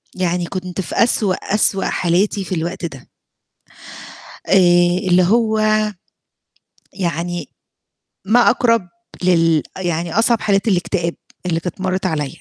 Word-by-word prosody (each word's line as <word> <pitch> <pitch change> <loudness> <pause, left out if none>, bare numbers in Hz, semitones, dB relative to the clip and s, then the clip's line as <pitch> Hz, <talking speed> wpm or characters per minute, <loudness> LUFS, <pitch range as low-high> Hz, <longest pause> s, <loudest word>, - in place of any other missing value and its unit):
يعني 180 -1 -1
كنت 185 -1 -4
في - - -7
أسوأ، 215 -5 +2
أسوأ 195 -1 +1
حالاتي 190 +3 0
في 185 - -3
الوقت 170 +2 -4
ده. 135 -6 -9 1.4
آآ، - - +1 0.5
اللي 180 0 +4
هو 220 +3 +2 1.3
يعني 175 -1 -3 0.8
ما 220 +5 +4
أقرب 230 -7 +1 0.3
لل 165 -4 +3
أ 190 - -6
يعني 170 +2 -1
أصعب 230 0 +2
حالات 200 +1 +1
الإكتئاب 175 -3 0 0.3
اللي 165 -2 0
كانت 180 +2 -6
مرِّت 185 0 -2
عليَّ. 150 -6 -2
185 Hz, 120 wpm, -18 LUFS, 170-200 Hz, 1.4 s, اللي